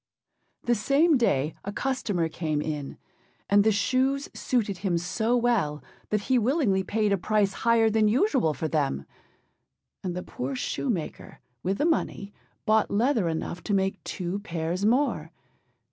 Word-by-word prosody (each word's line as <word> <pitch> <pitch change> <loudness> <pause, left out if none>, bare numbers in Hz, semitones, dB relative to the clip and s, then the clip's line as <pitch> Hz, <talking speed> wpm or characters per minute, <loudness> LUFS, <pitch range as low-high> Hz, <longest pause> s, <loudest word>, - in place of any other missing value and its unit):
The 240 - +2
same 280 +9 +3
day 155 - +1
a 200 - -4
customer 205 -9 -1
came 155 -2 -2
in, 150 -2 -4 0.5
and 205 0 +5
the 220 - +4
shoes 260 +6 +1
suited 210 -7 -1
him 185 -3 0
so 220 +8 0
well 220 -12 +1 0.3
that 210 -1 +1
he 255 +4 +2
willingly 230 - +2
paid 210 0 +1
a 195 - +1
price 205 0 +1
higher 230 0 +3
than 220 0 +3
usual 245 - +2
for 160 - -2
them; 140 - -1 1.0
and 180 -2 -3
the 180 - -4
poor 130 +2 -4
shoemaker, 180 - -3 0.2
with 195 +2 -1
the 295 - +1
money, 205 -11 -1 0.3
bought 215 0 +3
leather 225 -2 +2
enough 165 +2 -4
to 205 - +1
make 195 0 -1
two 185 +2 -3
pairs 175 -1 -3
more. 235 - +1
205 Hz, 150 wpm, -27 LUFS, 170-240 Hz, 1.0 s, and